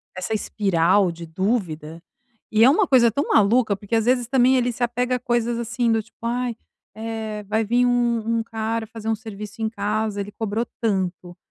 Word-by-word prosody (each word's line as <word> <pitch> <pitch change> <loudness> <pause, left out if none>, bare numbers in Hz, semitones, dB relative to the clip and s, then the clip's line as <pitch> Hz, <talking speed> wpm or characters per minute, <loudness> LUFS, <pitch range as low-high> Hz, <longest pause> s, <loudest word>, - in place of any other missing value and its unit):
essa 185 +4 -3
espiral 195 -3 +2
de 170 0 -9
dúvida, 165 -4 -2 0.5
e 220 +1 +4
é 250 - +8
uma 360 +7 +3
coisa 240 -4 +5
tão 280 +7 -1
maluca 220 +1 +3
porque, 205 +3 -3
às 225 -1 +2
vezes, 245 -1 +2
também 260 0 +4
ele 245 -1 +1
se 240 +1 -4
apega 245 +1 0
a - - -11
coisas 240 -1 0
assim, 235 0 0
do 225 0 +2
tipo: 225 +1 -23
"ai, 240 0 -1 0.4
eh, 220 -1 -5
vai 220 +1 +1
vim 240 +3 +2
um 235 -2 +1
um 225 - -2
cara 225 0 -3
fazer 225 0 -6
um 225 - +2
serviço 215 0 -9
em 220 - 0
casa, 210 0 -2
ele 200 +1 -6
cobrou 220 +2 -2 0.2
tanto". 185 -5 -2
225 Hz, 195 wpm, -23 LUFS, 205-240 Hz, 0.5 s, é